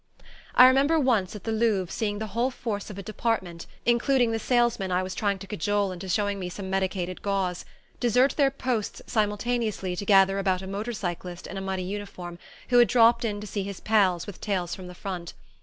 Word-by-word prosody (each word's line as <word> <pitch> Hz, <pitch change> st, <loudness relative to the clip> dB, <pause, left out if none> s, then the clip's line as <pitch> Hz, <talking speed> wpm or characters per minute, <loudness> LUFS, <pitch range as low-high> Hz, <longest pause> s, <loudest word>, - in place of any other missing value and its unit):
I 250 Hz, -, +10 dB
remember 275 Hz, +5 st, +5 dB
once, 225 Hz, -9 st, +1 dB
at 210 Hz, -, -8 dB
the 225 Hz, -, -2 dB
Louvre, 215 Hz, -5 st, +1 dB
seeing 205 Hz, -2 st, -1 dB
the 220 Hz, -, -3 dB
whole 240 Hz, +3 st, +1 dB
force 220 Hz, -5 st, -4 dB
of 205 Hz, -, -8 dB
a 200 Hz, -, -6 dB
"department," 190 Hz, -5 st, -2 dB, 0.2 s
including 240 Hz, 0 st, +3 dB
the 225 Hz, -, -1 dB
salesman 240 Hz, -5 st, +1 dB
I 180 Hz, +1 st, +1 dB
was 185 Hz, 0 st, -4 dB
trying 200 Hz, 0 st, 0 dB
to 195 Hz, -, -9 dB
cajole 205 Hz, +1 st, 0 dB
into 185 Hz, +1 st, -7 dB
showing 205 Hz, +1 st, 0 dB
me 180 Hz, -1 st, -4 dB
some 190 Hz, +1 st, -6 dB
medicated 185 Hz, -1 st, -2 dB
gauze, 195 Hz, -3 st, -1 dB, 0.3 s
desert 250 Hz, +3 st, +3 dB
their 280 Hz, -2 st, +4 dB
posts 250 Hz, -5 st, -3 dB
simultaneously 210 Hz, -3 st, -1 dB
to 190 Hz, -, -4 dB
gather 195 Hz, -1 st, +5 dB
about 190 Hz, -1 st, 0 dB
a -, -, -6 dB
motor 205 Hz, +5 st, -4 dB
cyclist 175 Hz, -3 st, -5 dB
in -, -, -7 dB
a 195 Hz, -, -4 dB
muddy 190 Hz, -1 st, -3 dB
uniform 180 Hz, -3 st, -6 dB, 0.3 s
who 245 Hz, -1 st, +5 dB
had 240 Hz, -, +7 dB
dropped 235 Hz, 0 st, +5 dB
in 210 Hz, -3 st, -2 dB
to -, -, -6 dB
see 205 Hz, 0 st, -3 dB
his 195 Hz, -1 st, -6 dB
pals 195 Hz, -6 st, +2 dB
with 205 Hz, -3 st, -9 dB
tales 180 Hz, -4 st, -1 dB
from 185 Hz, 0 st, -7 dB
the 180 Hz, -, -10 dB
front. 175 Hz, -3 st, -6 dB
205 Hz, 205 wpm, -26 LUFS, 185-230 Hz, 0.3 s, I